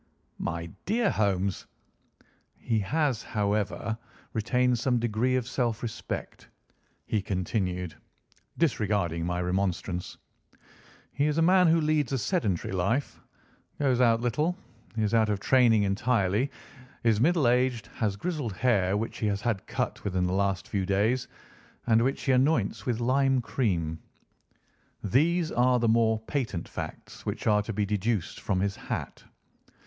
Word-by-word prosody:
"My 85 0 -3 0.2
dear 220 +1 +2
Holmes!" 95 -2 0 0.9
"He 115 -2 0
has, 135 +3 0
however, 105 +1 -1 0.4
retained 125 +2 +1
some 125 +1 +1
degree 120 +2 +1
of 125 -2 -1
self 120 -4 -1
respect," 115 -2 -5 0.6
he 105 - 0
continued, 90 -2 -2 0.6
disregarding 100 - 0
my 90 0 -1
remonstrance. 90 -1 -2 1.0
"He 145 +3 +1
is 150 0 0
a 165 - +4
man 180 +1 +5
who 165 +1 +4
leads 155 -4 +1
a - - +2
sedentary 105 - -1
life, 100 +10 -1 0.6
goes 130 -3 +2
out 115 -2 +4
little, 150 +9 0 0.4
is 110 -1 0
out 110 -2 +4
of 105 -2 0
training 115 -2 +4
entirely, 100 +3 +1 0.5
is 115 -2 +3
middle 160 -2 +3
aged, 125 -2 +2
has 105 -4 0
grizzled 145 - -3
hair 100 -3 +2
which 110 +2 -4
he 110 - 0
has 100 -1 -1
had 115 -6 -1
cut - - -3
within 90 -2 0
the 90 - -1
last 100 -1 0
few 100 -2 -1
days, 105 +7 +1 0.6
and 115 -1 +4
which 135 +2 -1
he 135 - +2
anoints 130 -5 +2
with 120 -2 0
lime 135 +2 +2
cream. 85 -11 -1 1.0
These 160 - +2
are 125 +1 +3
the 120 -1 +1
more 110 0 +3
patent 110 - -3
facts - - -8
which - - -4
are 105 -1 +4
to 105 - -5
be 105 -1 0
deduced 105 -1 -1
from 95 -2 -1
his 100 0 0
hat. - - -5
115 Hz, 145 wpm, -28 LUFS, 100-130 Hz, 1.0 s, man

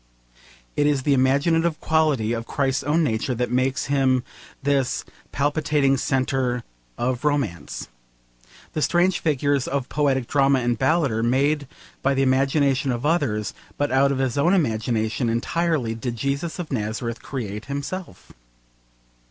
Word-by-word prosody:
It 145 - +2
is 140 -3 +1
the 145 - +3
imaginative 155 +5 +2
quality 150 -8 +1
of 115 0 -4
Christ's 135 -1 0
own 155 +3 +2
nature 120 -1 -1
that 125 +1 -2
makes 130 +1 +1
him 135 -3 +2 0.4
this 140 -2 0 0.3
palpitating 145 -1 +1
centre 130 -2 0 0.3
of 125 0 -1
romance. 140 -12 -2 0.9
The 155 - -2
strange 175 +3 +2
figures 145 -3 +1
of 135 -2 -2
poetic 135 -4 +1
drama 140 +1 +3
and 120 0 +1
ballad 145 +3 +2
are 110 +1 -1
made 140 +4 +1 0.3
by 140 0 +2
the 135 - +2
imagination 135 0 +2
of 120 +3 -3
others, 125 - 0 0.2
but 145 0 0
out 135 +1 +4
of 140 - -1
his 130 0 0
own 175 +7 +4
imagination 115 - 0
entirely 135 +1 0
did 120 +1 -4
Jesus 140 +7 -2
of 175 -4 -6
Nazareth 115 0 -3
create 105 -5 -5
himself. 145 +7 -6
135 Hz, 140 wpm, -23 LUFS, 125-145 Hz, 0.9 s, out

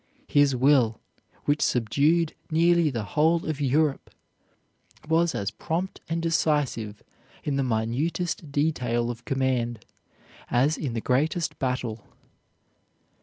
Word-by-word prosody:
His 145 -2 +3
will, 125 -3 +3 0.5
which 145 +1 +1
subdued 145 +8 +2 0.2
nearly 170 0 +3
the 115 -5 -3
whole 160 +11 +2
of 155 -2 -3
Europe, 145 +1 +1 1.0
was 165 +1 +2
as 100 +1 -2
prompt 180 +4 -3
and 165 +1 -1
decisive 145 -10 0 0.4
in 145 - -1
the 140 - +1
minutest 140 +8 -1
detail 125 -6 0
of 120 0 -10
command 125 -4 -1 0.6
as 140 +6 +2
in 135 -7 -4
the 115 - -2
greatest 155 +8 0
battle. 125 -4 -2
140 Hz, 115 wpm, -26 LUFS, 120-160 Hz, 1.0 s, His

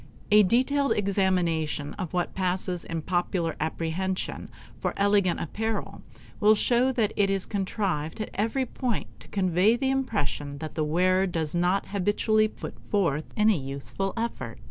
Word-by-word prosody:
A 210 0 +8
detailed 260 +7 +3
examination 180 -7 0
of 185 -5 -5
what 175 -1 -1
passes 180 -1 -1
in 165 -1 -4
popular 175 -2 0
apprehension 165 +4 -2 0.3
for - - -2
elegant 200 -3 +3
apparel 220 +6 -3 0.4
will 215 +1 +6
show 245 +4 +2
that 220 -4 +1
it 200 -1 +2
is 195 -1 +1
contrived 190 -6 -2
at 215 - -4
every 230 +6 0
point 245 -2 -2
to - - -15
convey 185 +3 +3
the 265 +2 0
impression 200 - -2
that 155 +1 -6
the 155 - 0
wearer 185 +5 +2
does 160 -4 -2
not 180 +3 +1
habitually 210 +2 +2
put - - -8 0.2
forth 165 -7 +1
any 210 -4 +4
useful 140 +8 -4
effort. 175 - -3
190 Hz, 145 wpm, -27 LUFS, 165-215 Hz, 0.4 s, A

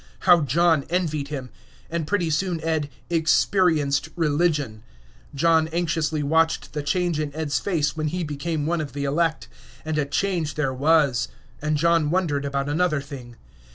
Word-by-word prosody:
How 175 -3 +6
John 160 +2 +3
envied 160 -5 -1
him! 135 -5 -6 0.4
And 165 -2 -3
pretty 175 -4 0
soon 175 +2 0
Ed 160 -3 -1 0.2
"experienced 160 -3 +2
religion." 150 -8 0 0.5
John 160 +2 +3
anxiously 160 -2 -1
watched 160 +3 +1
the 150 - -2
change 170 +2 0
in 150 -2 -2
Ed's 145 -5 -1
face 150 -4 0
when 155 -1 -2
he 175 +3 -2
became 150 0 -3
one 170 +1 0
of 150 - -6
the 140 0 -3
elect. 155 -3 0 0.4
And 155 -1 -1
a 145 - +1
change 165 -1 -1
there 135 -4 0
was. 140 -3 +2 0.3
And 155 0 0
John 165 -1 +3
wondered 155 -5 0
about 140 0 -2
another 155 +1 +1
thing. 130 -4 -9
155 Hz, 155 wpm, -24 LUFS, 145-170 Hz, 0.5 s, How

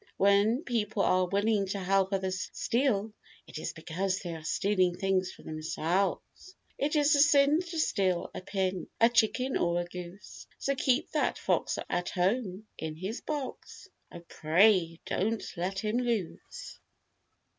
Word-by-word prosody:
When 200 +7 +3
people 220 -3 -1
are 185 0 +3
willing 200 +1 +1
to 195 +1 -3
help 195 +1 +1
others 190 -1 -2
steal 225 -4 0 0.3
it - - -8
is - - -4
because 180 +4 -2
they 175 -3 -5
are 160 -1 -8
stealing 185 +1 +1
things 190 -1 0
for - - -16
themselves. 165 - -2 0.2
It 295 +3 0
is 295 0 +4
a - - +2
sin 285 +1 +5
to 345 -2 -7
steal 190 - 0
a - - -6
pin, 190 -1 -2
A 230 - +6
chicken 240 +3 +2
or 170 0 +1
a 175 - -2
goose. 180 +2 -10
So 275 - -1
keep 270 +3 +1
that - - 0
fox - - 0 0.4
home 195 +2 0
in 155 -1 -4
his 190 +8 -5
box. 290 -4 -6 0.2
Oh, 170 - -9
pray, 170 0 +3
don't 220 +4 -1
let 185 +3 -3
him 215 +4 -1
loose. 235 -8 -4
195 Hz, 150 wpm, -29 LUFS, 180-235 Hz, 0.4 s, A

